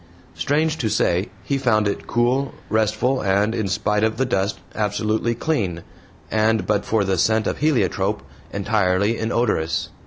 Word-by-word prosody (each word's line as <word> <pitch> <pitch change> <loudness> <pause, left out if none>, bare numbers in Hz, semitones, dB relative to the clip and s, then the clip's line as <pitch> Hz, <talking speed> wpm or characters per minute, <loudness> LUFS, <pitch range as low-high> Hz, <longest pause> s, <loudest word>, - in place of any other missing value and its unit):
Strange 150 - 0
to 110 - 0
say, 95 +2 +1
he 140 -1 -1
found 110 -5 +2
it 100 - -3
cool, 125 +3 +1 0.2
restful, 110 +4 +1
and, 100 +3 +2
in 110 -3 -1
spite 105 +2 0
of 110 0 +1
the 130 - +1
dust, 100 -4 -1
absolutely 110 +2 0
clean, 100 - -1 0.5
and, 110 0 +2
but 105 -1 +1
for 110 0 +1
the 95 -2 0
scent 110 +3 +2
of - - -2
heliotrope, 145 - +1 0.3
entirely 100 +1 +1
inodorous. 110 -8 0
110 Hz, 150 wpm, -22 LUFS, 100-120 Hz, 0.5 s, found